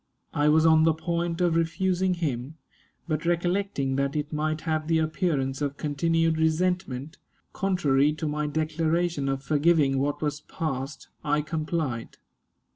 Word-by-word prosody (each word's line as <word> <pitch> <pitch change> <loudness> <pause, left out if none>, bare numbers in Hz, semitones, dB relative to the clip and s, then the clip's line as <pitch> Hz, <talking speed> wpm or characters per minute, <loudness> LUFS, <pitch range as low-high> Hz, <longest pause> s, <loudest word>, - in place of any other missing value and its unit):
I 145 +1 +3
was 160 +1 +4
on 160 -1 +6
the 160 -1 +4
point 170 +1 -2
of 175 -2 +2
refusing 180 +2 +1
him, 145 -4 -3 0.5
but 155 -2 -1
recollecting 175 -5 0
that 140 +1 0
it 150 +1 -2
might 155 +1 -1
have 155 -1 -1
the 165 -1 +3
appearance 155 -4 0
of 140 -1 -2
continued 165 +2 +1
resentment, 160 -3 0 0.3
contrary 150 -7 +2
to 155 0 -4
my 150 0 -1
declaration 160 0 0
of 135 0 -2
forgiving 150 -2 +3
what 145 +2 -1
was 150 -1 -2
past, 145 -2 -5
I 150 0 +1
complied. 155 -6 -3
155 Hz, 140 wpm, -26 LUFS, 145-165 Hz, 0.5 s, on